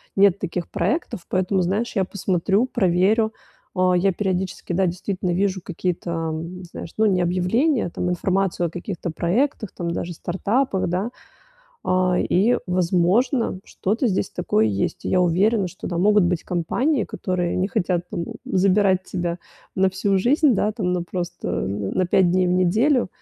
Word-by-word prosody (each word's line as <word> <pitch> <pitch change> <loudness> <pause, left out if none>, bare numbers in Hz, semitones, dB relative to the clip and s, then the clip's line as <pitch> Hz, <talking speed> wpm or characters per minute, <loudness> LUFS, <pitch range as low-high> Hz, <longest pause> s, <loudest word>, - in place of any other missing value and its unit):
нет 200 -1 +4
таких 175 -2 -4
проектов, 315 - -1
поэтому, 185 +1 +1
знаешь, 200 +8 -1
я 195 - +2
посмотрю, 190 +3 0
проверю. 220 0 +2 0.4
А, 185 0 +3
я 190 +2 +3
периодически, 185 -2 -2
да, 190 +2 +2
действительно 185 +1 -3
вижу 190 +1 0
какие-то, 180 0 -3
м, 165 +2 -4
знаешь, 170 -1 -8
ну, 220 - +3
не 190 -4 +3
объявления, 185 - +1
там, 180 - -3
информацию 180 0 0
о - - -6
каких-то 175 0 -5
проектах, 215 - 0
там, 170 -1 -3
даже 170 +1 -3
стартапах, 190 +5 -1
да. 190 +7 -1 0.7
А, 185 0 +2
и, 215 +7 +2
возможно, 185 - +1
что-то 220 +7 -1
здесь 190 -2 -1
такое 110 -11 +1
есть. 100 -2 -2
И - - -2
я 185 - +3
уверена, 190 +4 +2
что, 185 - -9
да, 175 - -3
могут 205 +1 +4
быть 175 -1 0
компании, 225 - 0
которые 180 -2 -2
не 185 +1 0
хотят 175 -2 -1
там 170 - -3 0.2
забирать 190 0 +2
тебя 175 -2 -3 0.4
на 190 0 +4
всю 195 +1 +1
жизнь, 280 - +3
да, 210 +1 +1
там, 190 -5 -1
на 180 -1 0
просто, 175 0 -5
э, - - -1
на 100 - -1
5 180 0 +3
дней 185 +1 +2
в 180 - +1
неделю, 215 +9 +2
185 Hz, 165 wpm, -22 LUFS, 175-200 Hz, 0.7 s, нет